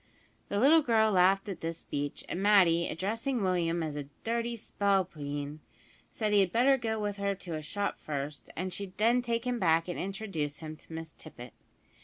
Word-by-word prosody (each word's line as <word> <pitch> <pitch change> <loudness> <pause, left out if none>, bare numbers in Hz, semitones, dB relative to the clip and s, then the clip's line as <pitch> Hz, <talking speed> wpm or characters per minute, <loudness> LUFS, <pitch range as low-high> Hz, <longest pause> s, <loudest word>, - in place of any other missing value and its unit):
The 200 - 0
little 305 +7 +6
girl 220 -5 +3
laughed 195 +1 +4
at 195 - -5
this 165 0 -3
speech, 145 -2 -4
and 180 - -3
Matty, 185 -5 +5
addressing 225 - -2
Willie 180 -3 +1
as 165 -3 -2
a 145 -1 -4 0.2
"dirty 235 +1 -1
spalpeen," 155 -9 -1 0.5
said 215 -2 -1
he 205 - +6
had 190 -3 +3
better 255 +5 +5
go 225 -4 -2
with 205 -1 -2
her 200 0 0
to 180 -3 -7
a 155 - -3
shop 200 +6 -3
first, 145 0 -5
and 185 +2 -3
she'd 195 -2 -6
then 235 +3 +4
take 235 0 -2
him 245 -1 -1
back 165 -2 +3
and 175 - -4
introduce 190 -7 -3
him 155 0 -7
to - - -17
Miss 160 0 -6
Tippet. 120 0 -11
195 Hz, 190 wpm, -30 LUFS, 160-220 Hz, 0.5 s, little